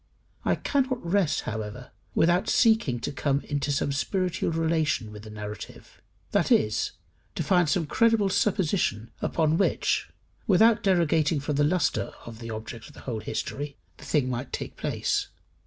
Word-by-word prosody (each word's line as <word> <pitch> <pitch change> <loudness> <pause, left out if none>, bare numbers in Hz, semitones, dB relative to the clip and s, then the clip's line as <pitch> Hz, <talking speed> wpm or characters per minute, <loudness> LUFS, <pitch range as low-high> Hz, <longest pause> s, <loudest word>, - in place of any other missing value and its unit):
I - - +2
cannot 260 -6 -1
rest, 180 -2 +2
however, 110 +3 -6 0.2
without 175 +6 +3
seeking 220 - +3
to - - -2
come 140 0 0
into 145 0 -2
some 140 0 0
spiritual 180 +5 -1
relation 160 -8 0
with 105 -1 -9
the - - -9
narrative, 105 0 -9 0.3
that - - +1
is, 105 0 +2 0.4
to - - -1
find 175 -1 +3
some 165 +3 +1
credible 225 +4 +3
supposition 170 - +1
upon 160 0 +1
which, 195 - +1 0.4
without 215 +3 +5
derogating 165 -5 +2
from 145 0 -2
the 145 - +4
lustre 175 +4 +1
of 115 -1 -9
the 115 -1 -7
object 110 0 -7
of - - -15
the - - -12
whole 115 -4 -4
history, 140 +5 -4 0.2
the - - -12
thing 145 -5 +1
might 125 +1 -3
take - - -5
place. - - -1
150 Hz, 155 wpm, -27 LUFS, 120-180 Hz, 0.4 s, without